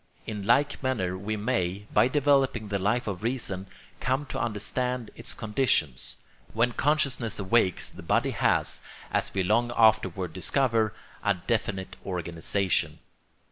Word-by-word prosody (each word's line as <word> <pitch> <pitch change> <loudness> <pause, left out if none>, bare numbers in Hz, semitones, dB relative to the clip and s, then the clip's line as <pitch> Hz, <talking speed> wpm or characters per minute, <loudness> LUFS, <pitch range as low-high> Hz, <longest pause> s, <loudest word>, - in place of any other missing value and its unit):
In 105 -2 -4
like 120 +8 +2
manner 110 -10 -1
we 105 +3 -3
may, 105 -4 -1
by - - +5
developing 135 -5 +2
the 100 -1 -1
Life 105 +6 +1
of 95 -4 -4
Reason, 110 -5 -2 0.3
come 130 +3 0
to - - -4
understand 120 +2 -2
its - - -5
conditions. 105 - 0 0.4
When 115 +2 +2
consciousness 135 -5 +1
awakes 100 -1 +2
the - - -11
body - - +1
has, - - +1 0.3
as - - +1
we 95 - 0
long 115 +6 +2
afterward 110 -6 +3
discover, 110 - +1 0.3
a 100 -1 +3
definite 95 -1 -2
organisation. 85 -2 0
110 Hz, 135 wpm, -27 LUFS, 95-125 Hz, 0.4 s, by